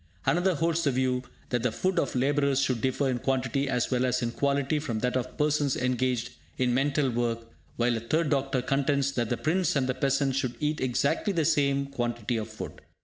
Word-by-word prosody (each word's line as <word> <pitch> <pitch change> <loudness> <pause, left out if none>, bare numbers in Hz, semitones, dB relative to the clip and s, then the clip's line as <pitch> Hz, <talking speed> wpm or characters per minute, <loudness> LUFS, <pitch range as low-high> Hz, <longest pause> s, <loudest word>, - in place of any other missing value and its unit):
Another 175 +1 +2
holds 165 +2 +1
the 145 - +3
view 130 -1 +1 0.3
that 120 -2 0
the 125 0 +1
food 185 +10 0
of - - -1
labourers 140 +1 +2
should 130 -4 0
differ 130 +2 +1
in 125 -2 0
quantity 135 +1 0
as 125 -1 0
well 125 0 +2
as 125 -1 +1
in 115 - -1
quality 140 +3 0
from 120 -7 -3
that 125 0 0
of 130 - -3
persons 150 -2 +1
engaged 125 -1 0 0.3
in 125 -1 +1
mental 135 +1 +1
work, 115 -1 -2 0.2
while 120 0 +1
a - - -1
third 150 +7 0
doctor 135 -2 0
contends 140 +1 +1
that 120 -4 -1
the 120 - 0
prince 175 +2 +1
and 135 -2 +2
the 130 - 0
peasant 135 +1 +1
should 130 -2 -1
eat 150 0 -1
exactly 135 - +1
the 165 -4 +1
same 140 -3 +2
quantity 120 -3 -2
of 110 0 -4
food. 110 - -8
135 Hz, 205 wpm, -28 LUFS, 125-140 Hz, 0.3 s, the